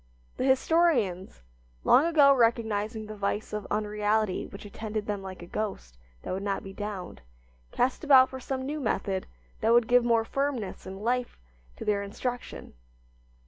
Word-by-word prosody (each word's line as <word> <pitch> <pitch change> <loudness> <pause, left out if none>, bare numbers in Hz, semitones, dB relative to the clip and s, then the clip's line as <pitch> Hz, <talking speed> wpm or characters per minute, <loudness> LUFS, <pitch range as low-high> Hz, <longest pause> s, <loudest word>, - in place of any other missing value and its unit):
The - - -1
historians, 260 - +2 0.4
long 275 - +5
ago 290 -4 +6
recognizing 220 -3 +1
the 215 0 -8
vice 205 +1 -2
of 210 -1 -4
unreality 210 -1 0
which 200 - -11
attended 215 +1 -5
them 205 -2 -3
like 190 -2 -8
a - - -8
ghost 175 - -5 0.2
that - - -4
would 190 - -3
not 200 -1 -2
be 195 - -9
downed, 200 - -6 0.5
cast 255 +5 0
about 265 -3 +7
for 260 - -7
some 260 +1 -4
new 300 +3 -3
method 195 -6 -1 0.3
that 225 - +3
would 235 -1 +5
give 245 0 +5
more 230 -1 +2
firmness 275 -6 -3
and 190 +2 -8
life 245 +1 -1 0.4
to - - -7
their 205 -1 +1
instruction. 245 +5 -5
215 Hz, 160 wpm, -28 LUFS, 200-250 Hz, 0.5 s, about